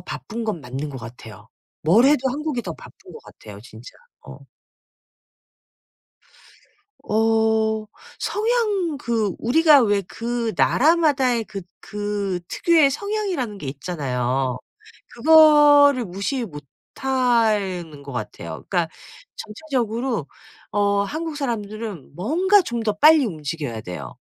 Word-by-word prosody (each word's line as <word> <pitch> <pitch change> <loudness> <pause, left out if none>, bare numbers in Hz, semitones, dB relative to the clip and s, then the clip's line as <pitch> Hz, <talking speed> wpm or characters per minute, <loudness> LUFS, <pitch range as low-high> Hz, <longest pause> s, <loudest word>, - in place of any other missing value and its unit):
바쁜 150 - -6
건 210 -8 -3
맞는 135 +3 -6
것 135 - -8
같아요. 110 -2 -12 0.3
뭘 195 +11 +4
해도 270 -2 +3
한국이 290 -3 -3
더 170 - -5
바쁜 - - -15
거 - - -10
같아요 105 -2 -13
진짜. 115 +1 -13 0.3
어. - - -12 2.7
어 220 0 +1 0.3
성향 420 - 0
그 225 - -1
우리가 300 +3 +5
왜 205 -2 +1
그 230 +3 -4
나라마다의 270 -6 +2
그 195 -3 -8 0.2
그 205 -3 -3
특유의 320 -5 +3
성향이라는 370 - -3
게 150 - -8
있잖아요. 130 -4 -2 0.6
그거를 290 -2 +6
무시 200 +7 -3
못 150 -7 -9 0.3
하는 215 - 0
것 140 - -9
같아요. 85 -8 -7
그러니까 175 -4 0 0.5
전체적으로 235 - -3 0.4
어 200 -1 +1
한국 310 +5 -5
사람들은 215 - -5
뭔가 360 - +3
좀 235 -6 -4
더 215 -2 0
빨리 300 +6 +5
움직여야 150 - -5
돼요. 75 - -8
220 Hz, 230 characters per minute, -22 LUFS, -, 2.7 s, 그거를